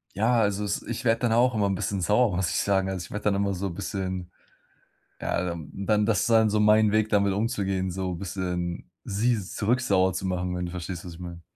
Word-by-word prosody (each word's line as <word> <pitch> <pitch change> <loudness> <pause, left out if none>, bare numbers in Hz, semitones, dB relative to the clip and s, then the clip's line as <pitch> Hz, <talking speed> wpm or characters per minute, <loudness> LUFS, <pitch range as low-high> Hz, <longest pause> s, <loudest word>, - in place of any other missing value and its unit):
Ja, 115 +4 +3
also 100 -1 0
es 100 -1 -1
ich 120 +1 -5
werde 115 -1 +2
dann 120 -2 +2
auch 125 +2 +4
immer 105 -2 +1
'n 100 - 0
bisschen 95 +1 -2
sauer, 105 +2 +3
muss 90 -2 0
ich - - -1
sagen. 95 -1 +1
Also, 95 -2 -4
ich - - -15
werde 105 - -5
dann 105 -1 +3
immer 100 0 0
so 95 +1 -3
bisschen. 95 -1 -4 0.9
Ja, 85 - -1
dann 85 -3 -5
dann 105 +2 +1
das 110 -3 +2
dann 110 -1 +5
so 105 - +1
mein 105 0 +5
Weg, 110 0 +2
damit 100 -1 +3
umzugehen, 95 -3 -1
so 90 0 -3
bisschen 90 -1 -4 0.2
sie 110 +3 +1
zurück 105 +6 0
sauer 95 -5 +2
zu 95 - -4
machen, 90 -1 -2
wenn 90 0 -2
du - - -6
verstehst, 90 -1 -5
was 90 -2 -8
ich - - -13
meine. 85 -1 -8
100 Hz, 230 wpm, -26 LUFS, 90-105 Hz, 0.9 s, dann